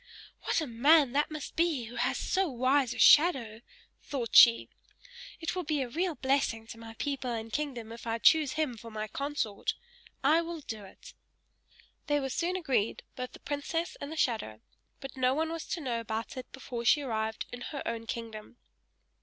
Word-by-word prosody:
"What - - +1
a - - -1
man 280 +3 +4
that 290 +3 +1
must 305 -2 -7
be 325 -6 +1
who 230 +2 -9
has 250 +2 0
so 385 -2 0
wise 260 0 +2
a 245 - -5
shadow!" 260 -9 +5 0.4
thought 250 -5 -4
she. 230 -1 +8 0.7
"It 325 +2 -3
will 365 - -1
be 300 -4 -1
a - - -5
real 340 +5 -1
blessing 265 -4 0
to 225 - -9
my 225 0 -10
people 275 -1 -3
and 225 -1 -4
kingdom 255 -7 -3
if 230 0 -9
I 225 0 0
choose 295 +3 +4
him 300 -6 -1
for 230 +1 -10
my 215 -1 -4
consort 275 -4 -2 0.5
I 310 +5 +5
will 335 -1 -6
do 220 -6 -7
it!" - - -14 0.9
They 290 -1 +2
were 270 -1 -3
soon 350 +6 -1
agreed, 260 - 0
both 255 0 -6
the - - -12
princess 295 +4 -3
and 285 - -5
the 320 - -6
shadow; 215 - -1 0.4
but 270 -2 -8
no 260 0 +2
one 320 +2 -1
was 330 -1 -5
to 345 - -3
know 245 -5 -2
about 225 0 -4
it 255 -1 -8
before 250 -3 -6
she 285 +6 +4
arrived 220 -3 -2
in 245 - -7
her 280 +2 -5
own 230 -1 -4
kingdom. 225 0 -7
260 Hz, 190 wpm, -30 LUFS, 230-300 Hz, 0.9 s, she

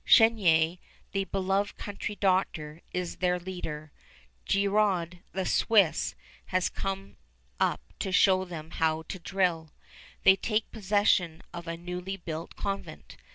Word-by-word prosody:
Chenier, 180 -8 +5 0.3
the 195 -1 0
beloved 195 +1 0
country 205 +1 -5
doctor, 175 -5 0
is 180 -1 -3
their 180 0 +2
leader. 160 -4 -6 0.6
Girod, 195 -3 +2
the 190 -1 -2
Swiss, 200 -6 +3 0.3
has 185 -1 +1
come 195 0 -4 0.4
up - - +1 0.2
to 190 - -2
show 185 0 +5
them 165 -3 -8
how 160 -1 +1
to 185 +4 -7
drill. 170 -3 0 0.5
They 190 - +8
take 215 +3 -1
possession 200 -5 +2
of 170 0 -7
a 165 0 -3
newly 180 +2 -5
built 165 -2 -6
convent. 195 -1 -5
185 Hz, 125 wpm, -29 LUFS, 170-195 Hz, 0.6 s, They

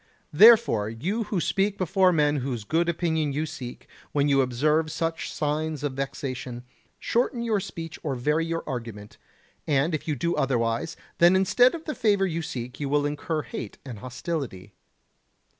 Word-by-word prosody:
Therefore, 210 - +6
you 185 - -2
who 205 -3 -1
speak 200 +4 0
before 185 +1 +3
men 150 -3 +2
whose 125 -4 -3
good 165 +9 +1
opinion 160 -3 0
you 150 +3 -1
seek, 125 -5 -8 0.3
when 145 0 +2
you 140 -1 +4
observe 150 +5 +1
such 165 +1 -2
signs 150 0 -2
of 145 -2 -1
vexation, 130 -2 -5 0.3
shorten 240 0 0
your 220 -3 +1
speech 165 -4 -7
or 140 -4 -2
vary 150 +6 +1
your 165 0 -3
argument; 115 -6 -6 0.5
and 150 +3 +2
if 155 - -3
you 150 - 0
do 170 +7 -1
otherwise, 120 +3 0 0.2
then 175 +2 +6
instead 245 - +4
of 325 - -9
the 305 - -3
favour 205 -6 +2
you 170 -2 -2
seek 125 -5 -6
you 145 -2 -2
will 145 0 +2
incur 150 +1 -2
hate 115 -3 -7
and 120 -6 -7
hostility. 125 - -5
150 Hz, 165 wpm, -26 LUFS, 130-170 Hz, 0.5 s, Therefore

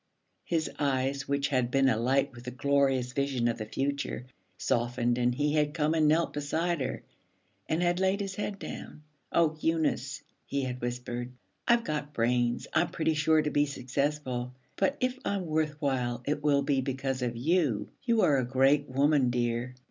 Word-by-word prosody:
his 165 -2 0
eyes, 135 -1 0
which 140 0 0
had 130 -3 +1
been 135 +1 +3
alight 130 +3 +2
with 120 0 -11
the - - -3
glorious 130 -1 +1
vision 135 -3 0
of 115 - -1
the 110 - -4
future, 140 0 -2 0.3
softened, 120 0 0
and 125 0 +2
he 145 +2 +1
had 150 0 +1
come 155 -1 +1
and 155 -2 +3
knelt 160 +2 +2
beside 160 +3 -1
her 130 0 -3 0.7
and 165 +3 +1
had 175 0 +2
laid 190 +1 +2
his 195 -1 -3
head 205 0 -3
down. 150 - -8 0.3
'Oh, 160 -2 +3
Eunice,' 155 -5 0 0.2
he 140 -1 -1
had 125 -1 -4
whispered, 120 0 -4 0.4
'I've 235 -1 +4
got 150 -3 -3
brains; 120 +1 +1
I'm 165 +2 +3
pretty 160 0 0
sure 155 +1 +3
to 150 - -1
be 145 0 +2
successful; 130 -2 -2 0.2
but 275 - +1
if 255 0 0
I'm 200 -2 -1
worth 155 -2 -1
while, 125 -4 -1
it 150 0 -1
will 140 -2 +3
be 140 -1 +1
because 135 0 -2
of 120 -2 -2
you. 135 - +1
You 230 -3 +2
are 145 -6 +4
a - - +1
great 135 +3 +3
woman, 140 0 +3
dear.' 120 +1 -1
140 Hz, 180 wpm, -29 LUFS, 125-155 Hz, 0.7 s, I've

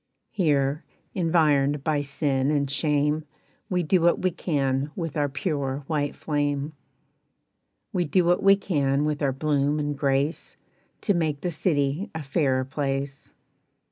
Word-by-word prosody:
"Here, 145 -6 +1 0.3
environed 150 -5 +2
by 150 -2 +1
sin 140 -1 0
and 140 -2 +1
shame, 150 +1 +1 0.5
We 180 -1 +1
do 175 +3 +2
what 170 +1 +3
we 185 - +2
can 140 -4 -1
with 165 -6 -4
our 145 -2 +1
pure 140 -2 -2
white 145 -2 -1
flame. 145 0 -1 1.2
"We 175 -1 +1
do 170 +4 +2
what 175 +1 +3
we 195 0 +6
can 145 -7 0
with 150 0 -1
our 140 -2 +2
bloom 145 +1 0
and 145 -1 -1
grace, 140 +3 -1 0.4
To 205 - +2
make 155 -5 -1
the 180 - -1
city 150 +1 0
a 160 - -4
fairer 135 -2 +1
place. 135 0 -3
145 Hz, 140 wpm, -25 LUFS, 140-160 Hz, 1.2 s, we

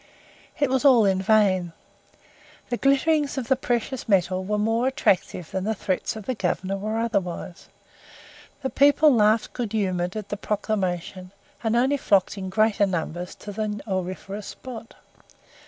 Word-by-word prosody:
It 285 -4 +1
was 265 0 +1
all 250 -6 +6
in 190 -1 +2
vain. 190 -4 +2 1.0
The 240 - -1
glitterings 285 +1 +2
of 250 -4 -4
the 265 - +5
precious 245 -1 -2
metal 185 -1 +2
were 210 +2 -1
more 225 +4 +1
attractive 185 -9 0
than 190 - -2
the 220 +2 -1
threats 190 +2 -2
of 215 -2 -8
the 255 - -1
Governor 195 -2 -2
were 215 +3 -3
otherwise. 195 -6 -3 0.9
The 265 - -2
people 290 +1 +5
laughed 215 -1 +3
good 235 -4 -4
humoured 185 -3 -1
at 210 -2 -5
the 205 - -3
proclamation, 190 -3 -3 0.3
and 225 0 +1
only 260 +4 +3
flocked 200 -8 +2
in 190 -2 -5
greater 215 0 +2
numbers 175 0 -4
to 205 - -9
the 210 0 -3
auriferous 190 +2 -4
spot. 235 -3 -9
210 Hz, 155 wpm, -24 LUFS, 190-240 Hz, 1.0 s, all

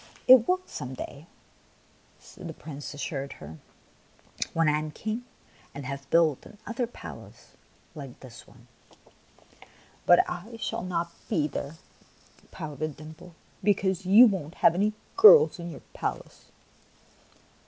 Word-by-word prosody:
" - - -28
It 255 -2 +8
will 370 0 +2
some 130 -2 -7
day," 145 +5 -9 1.1
the 170 -4 -8
Prince 145 -1 -8
assured 140 -1 -4
her, 80 +1 -11 0.9
"when 165 -1 +1
I 150 0 +3
am 155 0 -5
King 220 +9 -5 0.5
and 140 -1 -7
have 140 0 -6
built 160 -5 +3
another 230 +3 -5
palace 240 - -12 0.4
like 140 -5 -10
this 120 -3 -13
one." - - -20 0.7
" - - -25
But 175 - +6
I 205 +7 -7
shall 225 0 -3
not 170 -2 -3 0.2
be 150 -2 +1
there," 140 +1 -6 0.7
pouted 155 -1 -6
Dimples, 160 +3 -12 0.3
"because 190 -2 +1
you 205 +7 +8
won't 185 -7 -1
have 165 - +7
any 205 +4 +1 0.2
girls 440 - +8
in 170 0 -6
your 160 - -10
palace." - - -5
165 Hz, 130 wpm, -27 LUFS, 145-205 Hz, 1.1 s, It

